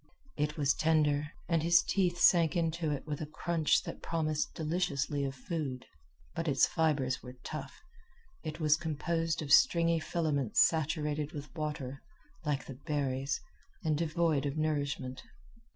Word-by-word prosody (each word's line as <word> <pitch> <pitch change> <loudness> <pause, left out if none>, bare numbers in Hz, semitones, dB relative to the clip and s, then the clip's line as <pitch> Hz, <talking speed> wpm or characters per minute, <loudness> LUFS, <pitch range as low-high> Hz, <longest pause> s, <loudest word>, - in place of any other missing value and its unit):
It 150 +2 -1
was 140 -3 +3
tender, 150 -2 +2 0.2
and 165 -2 +2
his 170 +2 +5
teeth 180 -3 +1
sank 170 -1 +5
into 165 -1 0
it 145 -2 -3
with 150 -1 -4
a 155 - -3
crunch 160 +1 +1
that - - -7
promised 155 -2 -1
deliciously 150 -3 -1
of 135 0 -3
food. 135 -2 -4 0.5
But 165 0 -3
its 135 -3 +4
fibers 140 -5 0
were 125 0 -10
tough. 150 - -7 0.6
It 155 0 -6
was 155 -1 +4
composed 165 +1 -1
of 140 - +1
stringy 170 -9 +5
filaments 150 - 0
saturated 150 -1 +2
with 145 -1 -8
water, 150 -4 -4 0.4
like 150 -3 -1
the 130 -2 -9
berries, 140 -2 -1 0.4
and 155 -1 +1
devoid 155 -2 +1
of 140 +2 -3
nourishment. 145 -4 -1
155 Hz, 145 wpm, -32 LUFS, 140-165 Hz, 0.6 s, his